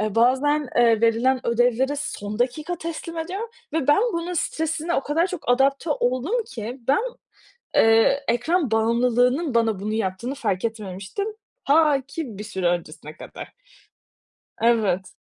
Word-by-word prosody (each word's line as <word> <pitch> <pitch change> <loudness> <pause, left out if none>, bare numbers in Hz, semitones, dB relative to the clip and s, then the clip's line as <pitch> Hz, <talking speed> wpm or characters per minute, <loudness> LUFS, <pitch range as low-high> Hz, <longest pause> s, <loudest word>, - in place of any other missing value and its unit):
Eee, 215 -1 -1
bazen, 265 +4 +2
eee, 230 -2 +4
verilen 235 +3 +2
ödevleri 245 +4 +2
son 210 -7 -5
dakika 305 +8 -1
teslim 335 0 -6
ediyorum 385 +8 -4 0.2
ve 315 -4 -1
ben 295 - +5
bunun 340 +1 -3
stresine 320 +1 -1
o - - +2
kadar 325 +6 +1
çok 365 -8 -7
adapte 275 +5 +2
oldum 285 - 0
ki, 240 +2 -7
ben, 285 +9 +3 0.7
eee, 225 +5 +4
ekran 270 +4 +1
bağımlılığının 245 +5 +2
bana 225 -4 +2
bunu 210 +2 -3
yaptığını 220 +5 -2
fark 205 -8 -2
etmemiştim. 210 - -4 0.4
Ta 295 -1 +4
ki 280 -9 -6
bir 210 - -6
süre 190 -4 -3
öncesine 155 -3 -4
kadar. - - -10 1.1
Evet. 210 -6 +2
250 Hz, 140 wpm, -23 LUFS, 225-300 Hz, 1.1 s, ben